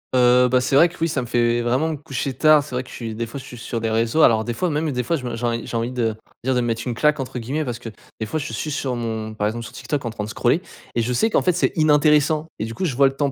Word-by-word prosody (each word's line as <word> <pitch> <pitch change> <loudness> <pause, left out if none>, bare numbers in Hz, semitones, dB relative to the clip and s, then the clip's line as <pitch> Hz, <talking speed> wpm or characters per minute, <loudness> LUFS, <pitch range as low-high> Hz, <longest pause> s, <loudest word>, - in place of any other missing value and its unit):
Heu, 125 0 +5
bah, 125 0 +3
c'est 130 +2 0
vrai 170 +5 +7
que 180 - -15
oui, 165 - +3
ça 150 -4 -1
me - - -5
fait 120 0 +1
vraiment 130 +6 +1
me 160 - -2
coucher 135 -2 -4
tard. 155 -1 +5
C'est 140 -3 -7
vrai 125 - -1
que, 125 - -16
je - - -11
suis, 115 -2 -5
des 115 +1 -2
fois 120 +5 -7
je - - -11
suis 125 - -10
sur 115 0 -4
des 115 - 0
réseaux, 115 +7 +1
alors 110 -6 +5
des 120 - -2
fois, 180 +10 -1
même 155 0 -1
des 125 -2 -1
fois, 125 +7 0
je 135 -5 -5
me 120 -1 -3
j'ai 115 - -7
env 115 0 0
j'ai - - -6
envie 115 +1 -1
de 115 -3 0 0.3
dire, 130 +1 +1
de 125 - +2
me 120 - -1
"mettre 115 -1 -1
une 125 - -1
claque", 150 +5 +2
entre 130 -1 -4
guillemets, 140 +7 -2
parce 120 -2 -4
que 115 - -7 0.3
des 110 - -3
fois 155 - -2
je 150 +1 -5
suis 155 - -3
sur, 135 -3 -2
mon 110 -2 -4
par 105 -1 -1
exemple, 115 +2 -3
sur - - -10
TikTok 145 -3 -3
en 115 - -2
train 110 -1 -5
de 105 - -6
scroller 120 +8 +1 0.3
et 120 - +1
je 120 +2 -1
sais 220 - +2
qu'en - - +3
fait 180 - +2
c'est 180 - +1
inintéressant 150 0 +3
et 110 - -1
du 115 0 -7
coup 190 - -2
je 140 -8 -1
vois 135 +1 +5
le 135 - -2
temps 140 0 0
125 Hz, 345 wpm, -22 LUFS, 115-150 Hz, 0.3 s, vrai